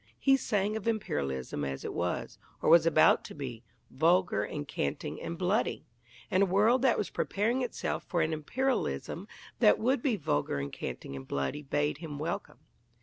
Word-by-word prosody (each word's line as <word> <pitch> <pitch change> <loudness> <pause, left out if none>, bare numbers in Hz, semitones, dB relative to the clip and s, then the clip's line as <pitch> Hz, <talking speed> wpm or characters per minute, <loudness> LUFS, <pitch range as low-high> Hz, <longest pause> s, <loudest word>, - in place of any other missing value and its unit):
He 270 -1 +4
sang 210 -5 0
of 220 0 -4
Imperialism 70 - -2
as 70 -1 -4
it - - -4
was, - - -3 0.2
or - - +2
was 170 -1 +7
about 155 -1 +5
to - - -9
be 130 -6 -6 0.3
vulgar 165 - +3
and 145 +7 -5
canting 70 - -3
and 170 - -5
bloody 185 +5 0 0.5
and 185 - +3
a - - +6
world 215 +7 +4
that 260 -3 +4
was 205 - -2
preparing 230 +6 0
itself 245 - -2
for 175 -3 0
an 160 +1 -1
Imperialism 155 - -2 0.3
that 105 - +6
would 255 +2 +1
be 250 -4 +1
vulgar 75 - -1
and 70 0 -4
canting 70 - -6
and 65 -1 -8
bloody 70 - -2
bade 145 +1 -1
him 155 -4 -6
welcome. 165 +7 -4
165 Hz, 175 wpm, -30 LUFS, 130-215 Hz, 0.5 s, was